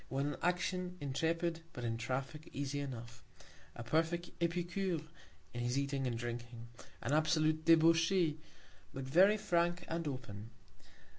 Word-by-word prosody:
When 135 +2 0
in 145 - -3
Action, 180 0 0
intrepid; 165 +4 -1
but 125 - -6
in 115 -1 -1
Traffick, 135 +6 -4
easy 140 0 -2
enough; 120 -4 -6 0.5
a 120 - -6
perfect 165 +7 0
Epicure 175 0 0 0.5
in 120 - -3
his 120 +2 0
Eating 140 -1 0
and 120 -2 -1
Drinking, 120 0 -6 0.3
an 135 - 0
absolute 155 0 +2
Debauchee, 165 0 +5 0.6
but 135 - -3
very 185 +10 +5
frank 175 -3 +1
and 165 -1 -2
open. 115 -6 -6
155 Hz, 135 wpm, -35 LUFS, 130-170 Hz, 0.6 s, Debauchee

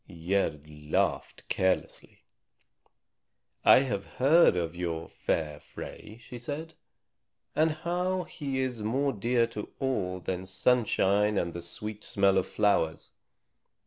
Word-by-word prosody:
Gerd 85 -4 -1
laughed 75 0 -2
carelessly. 95 0 -1 1.4
"I - - +8
have 100 -8 -3
heard 150 - +6
of 85 -1 -2
your 85 -2 -3
fair 75 -2 -2
Frey," 105 - -10
she 120 +1 -10
said, 150 +6 -5 0.8
"and 155 +2 +4
how 180 +4 -1
he 135 -5 -3
is 125 -4 -2
more 135 +6 0
dear 120 +3 +2
to 105 - -5
all 100 -9 -1
than 95 +1 -4
sunshine 105 -1 +2
and 85 -2 -1
the 85 - -5
sweet 105 +5 -6
smell 100 -1 +3
of 95 - -3
flowers. 100 -7 +1
105 Hz, 120 wpm, -29 LUFS, 90-130 Hz, 1.4 s, I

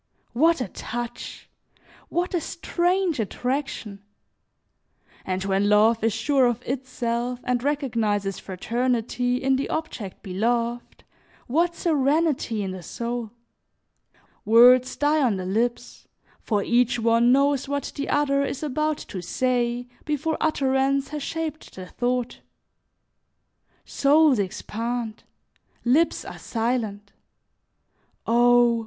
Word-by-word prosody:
What 320 +4 +3
a 250 - -2
touch! 240 +5 -6 0.6
What 355 +2 -1
a 350 - +1
strange 355 -2 0
attraction! 230 -2 -3 1.2
And 185 0 -3
when 195 +1 +1
love 220 +2 +4
is 225 - +3
sure 260 +4 +2
of 240 0 -2
itself 245 -2 -3
and 250 -1 0
recognizes 230 -9 -1
fraternity 245 +4 -1
in 265 +1 +1
the 275 - -3
object 285 - -5
beloved, 235 +5 -2 0.4
what 340 +7 +1
serenity 290 - +1
in 190 - -3
the 185 -1 -7
soul! 235 +5 -4 1.1
Words 245 +3 +6
die 295 +1 +2
on 240 -7 +2
the 185 -1 -4
lips, 230 +6 -2 0.3
for 205 -3 -1
each 245 0 +2
one 230 +1 +3
knows 280 +1 +2
what 285 0 -2
the 280 - -4
other 280 -1 +2
is 280 +1 -4
about 305 +1 0
to 185 - -5
say 245 +5 -1 0.2
before 300 +2 -1
utterance 275 -2 +1
has 300 0 -5
shaped 315 0 -5
the 185 - -7
thought. 245 +4 -2 1.5
Souls 290 -3 +4
expand, 225 +4 -4 0.6
lips 300 +8 +2
are - - -8
silent. 225 -4 -2 1.1
Oh! 240 0 +4
245 Hz, 110 wpm, -24 LUFS, 225-280 Hz, 1.5 s, Words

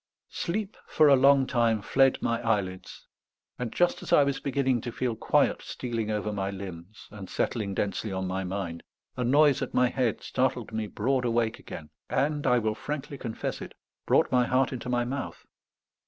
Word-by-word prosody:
Sleep 200 +4 -3
for 155 - +4
a 140 - +8
long 135 0 +5
time 115 -4 +2
fled 135 +4 +3
my 115 0 0
eyelids; 100 -5 -2 0.5
and 125 -3 -3
just 175 0 +1
as - - -7
I 145 - +7
was 140 -1 -1
beginning 130 -3 0
to 120 - -5
feel 120 -1 -2
quiet - - +2
stealing 115 -3 -4
over 105 0 -2
my 100 -1 -2
limbs, 95 +2 -9
and 100 -3 -9
settling 100 -5 -2
densely 100 +2 -2
on 95 0 -2
my 95 +1 -2
mind, 90 -3 -4 0.3
a 125 - -2
noise 145 +3 +4
at - - -4
my 125 0 +4
head 125 -5 -1
startled 125 -3 -1
me 110 -1 -2
broad 125 +6 0
awake 115 -2 0
again, 75 -2 -9 0.2
and, 145 +2 0
I 125 - +4
will 110 -2 0
frankly 145 +3 -5
confess 115 -3 -4
it, - - -9 0.3
brought - - +3
my 125 -1 +3
heart 130 +1 +2
into 125 0 -5
my 120 -1 +1
mouth. 135 +2 -5
120 Hz, 185 wpm, -28 LUFS, 105-135 Hz, 0.5 s, a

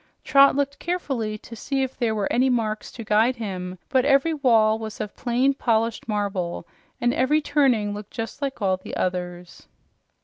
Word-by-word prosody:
Trot 275 0 +6
looked 280 0 -1
carefully 270 -12 -2
to 230 - -11
see 270 +4 -1
if 265 0 -4
there 230 -3 0
were 205 -2 0
any 255 +2 +3
marks 220 -3 -1
to 230 - -8
guide 220 +4 +3
him, 185 -5 -5
but 260 -1 +2
every 275 +4 +3
wall 225 -7 +3
was 220 -1 -7
of 210 -1 -5
plain, 255 +2 +1
polished 230 -4 0
marble, 200 -5 -2 0.3
and 240 0 +2
every 280 +4 +2
turning 265 -9 +2
looked 210 0 -8
just 225 +5 -6
like 270 -6 -3
all 190 -1 +2
the 185 - -7
others. 180 -1 -4
230 Hz, 175 wpm, -24 LUFS, 210-270 Hz, 0.3 s, Trot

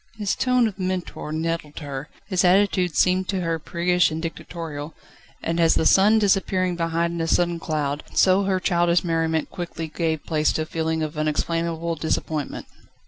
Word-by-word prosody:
His 205 -2 -1
tone 250 -2 +2
of 205 -2 -7
mentor 185 -4 -3
nettled 160 -1 -3
her, 145 -1 -6 0.2
his 185 -2 0
attitude 185 -2 +3
seemed 185 0 +3
to 190 -2 -1
her 165 -1 -1
priggish 175 +2 +1
and 155 0 -4
dictatorial, 160 -2 -6 0.5
and 165 +1 -1
as 165 -1 +4
the - - +1
sun 210 +3 +5
disappearing 190 -3 +1
behind 170 0 -1
a 165 - -1
sudden 170 0 +1
cloud, 150 -3 -2
so 190 +1 +4
her 190 -1 +1
childish 175 -2 +2
merriment 165 -2 0
quickly 170 -2 -5
gave 160 -1 -2
place 155 -2 +1
to 155 - -1
a - - -7
feeling 160 0 -2
of 155 0 -4
unexplainable 165 +2 -1
disappointment. 155 -1 -2
170 Hz, 165 wpm, -23 LUFS, 160-185 Hz, 0.5 s, sun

